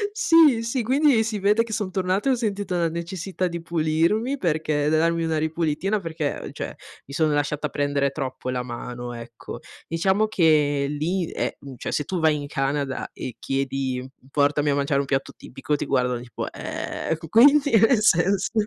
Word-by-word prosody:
Sì, 330 - +5
sì, 230 +2 -1
quindi 260 -1 +3
si 215 -2 -3
vede 210 +4 +3
che 225 -2 -7
son 205 -3 -2
tornata 190 +5 0
e - - +4
ho - - +2
sentito 205 -5 -2
la 170 -1 +2
necessità 175 +3 -3
di 170 -1 -5
pulirmi 170 - +1
perché 155 - 0
da 155 - +3
darmi 165 0 +1
una 160 -1 0
ripulitina 160 +5 -1
perché 160 -5 -4
cioè, - - -5 0.3
mi 140 - -11
sono 155 -2 +2
lasciata 145 +1 -1
prendere 140 0 0
troppo 130 -2 -4
la 125 - -1
mano, 120 0 -6
ecco. 115 0 -9 0.3
Diciamo 190 +6 +1
che 150 -7 +3
lì 165 +5 -1
è - - -2
mhmm, 135 -2 -10
cioè - - -5
se 145 - 0
tu 180 +5 -3
vai 160 -2 +3
in 145 - -5
Canada 135 -1 -2
e 125 - -7
chiedi 135 -1 -2 0.2
portami 145 +1 +2
a 140 - +2
mangiare 140 0 +1
un 140 - -2
piatto 135 0 -1
tipico, 135 +3 -4
ti - - -3
guardano 125 -1 0
tipo: 120 -1 -6
"Ehm, 160 - -4
q 165 0 -10
quindi? 280 - +6
Nel 225 +1 +5
senso" 195 0 +3
160 Hz, 185 wpm, -24 LUFS, 140-200 Hz, 0.3 s, quindi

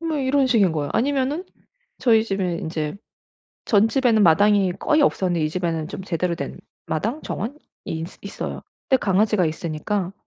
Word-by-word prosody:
뭐 325 -2 -2
이런 270 0 +2
식인 210 -8 +3
거예요. 145 -3 -2
아니면은 280 +6 0 0.5
저희 225 -3 +4
집에 190 -5 -1
인제 155 0 -3 0.7
전집에는 225 +1 +3
마당이 195 +2 +4
거의 300 - +2
없었는데 175 - +1
이 155 - +1
집에는 165 -2 -2
좀 190 - -6
제대로 175 -1 -1
된 - - -6 0.3
마당, 225 - -2
정원이 230 +8 -4 0.3
있어 165 +2 -5
있어요. 200 - -6 0.3
근데 265 - +4
강아지가 200 -1 +2
있으니까 170 +4 -3
200 Hz, 350 characters per minute, -23 LUFS, 170-240 Hz, 0.7 s, 저희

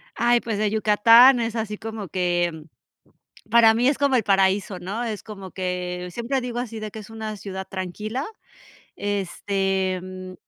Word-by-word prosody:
Ay, 240 0 +3
pues, 220 -3 -3
de 210 -1 +1
Yucatán 230 +4 +6
es 230 0 -2
así 215 -2 -3
como 220 -3 -6
que, 175 -3 -1 0.9
para 225 -1 +6
mí 240 +3 +2
es 280 - +2
como 280 -2 +2
el 230 - +2
paraíso, 195 -1 +2
¿no?, 200 +7 -4
es 220 -3 -4
como 195 -4 -9
que 180 -1 -4
siempre 245 +6 -2
digo 245 -1 -4
así 230 -3 -5
de 215 -1 -6
que 220 - -8
es 210 - -11
una 220 -1 -6
ciudad 190 -1 -7
tranquila. 210 +8 -4 0.7
Este, 195 -1 -1
mm, 185 0 -8
210 Hz, 165 wpm, -23 LUFS, 190-230 Hz, 0.9 s, Yucatán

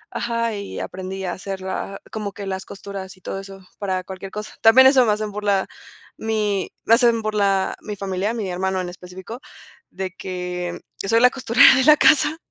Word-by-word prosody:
ajá, 230 -1 -1
y 200 -1 -6
aprendí 190 +1 -6
a 175 - -2
hacer 190 0 -6
la 190 +1 -5
como 210 -3 -4
que 200 +1 -7
las 190 0 -4
costuras 195 -1 -8
y - - -23
todo 195 - -5
eso 195 0 -11 0.2
para 185 -2 -2
cualquier 190 +1 -8
cosa, 210 0 -7
también 260 +4 +8
eso 260 -2 +5
me 215 - +3
hacen 210 0 -2
burla 205 -2 0 0.5
mi, 210 -3 -1
me 225 - +4
hacen 235 -2 +3
burla 200 -3 +1
mi 210 -1 -6
familia, 195 +2 -2
mi 210 -5 -3
hermano 190 +1 -1
en 180 - -5
específico, 180 +6 -10 0.5
de 185 -1 -4
que 180 -2 -5 0.2
yo 195 - -5
soy 230 - +4
la 250 - +7
costurera 255 0 +6
de 260 - +3
la 305 -1 +7
casa, 300 +2 +4
200 Hz, 190 wpm, -22 LUFS, 190-225 Hz, 0.5 s, también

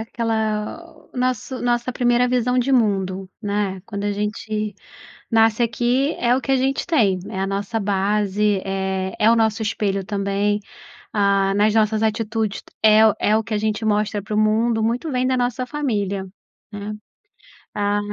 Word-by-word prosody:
aquela 220 +4 -2 0.3
o - - -11
nosso 255 0 -1
nossa 240 +1 0
primeira 245 0 +2
visão 250 0 +1
de 255 +2 +1
mundo, 195 -5 +1
né. 200 -2 -2
Quando 200 -2 -5
a 205 - 0
gente 210 0 -3 0.6
nasce 225 0 +3
aqui 245 +4 +1
é 245 0 +2
o 265 - -1
que 270 - -2
a - - +5
gente 265 +1 0
tem, 220 - +2
é 190 - -4
a 195 - 0
nossa 200 +3 -2
base, 205 0 +1
é 190 -1 -2
é 215 - +5
o 230 - +5
nosso 220 -1 +1
espelho 200 -2 -1
também, 200 +1 0 0.6
ah, 200 -1 +2
nas 210 +1 +3
nossas 215 0 +2
atitudes 220 -1 -1 0.2
é 220 0 +7
o 210 - +1
é 210 - +2
o 220 - +2
que 220 +1 -4
a - - +1
gente 215 +1 -1
mostra 210 0 +1
para 210 +2 -5
o - - +2
mundo, 220 +1 +2
muito 240 +8 -1
vem 255 -1 0
da 260 - +1
nossa 245 +1 -1
família, 210 -9 -2 0.4
né. 205 0 -6 0.8
Ah, 205 0 +1
215 Hz, 170 wpm, -21 LUFS, 205-235 Hz, 0.8 s, é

